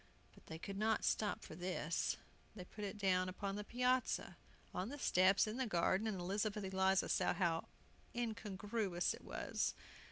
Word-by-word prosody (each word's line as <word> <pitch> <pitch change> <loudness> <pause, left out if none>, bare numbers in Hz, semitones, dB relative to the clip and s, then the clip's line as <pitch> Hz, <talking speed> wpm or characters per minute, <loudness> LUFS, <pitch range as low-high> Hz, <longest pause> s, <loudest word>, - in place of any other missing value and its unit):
But - - -19
they 160 - -6
could 195 +4 -5
not 220 0 +2
stop 210 -2 +1
for - - -8
this. 175 -1 -1 0.4
They 180 -4 -7
put 210 +3 -8
it 205 +1 -3
down 185 -2 +2
upon 195 +1 -3
the 210 - -3
piazza, 250 +3 +1 0.4
on 185 +4 -2
the 290 - -5
steps, 190 -6 +5
in 215 +2 -3
the 260 -2 0
garden, 190 +3 +2
and 200 -4 -1
Elizabeth 205 +3 -1
Eliza 190 0 +2
saw - - +2
how 170 -3 +1 0.5
incongruous 205 -4 -1
it - - -11
was! - - -1
195 Hz, 165 wpm, -39 LUFS, 185-215 Hz, 0.5 s, steps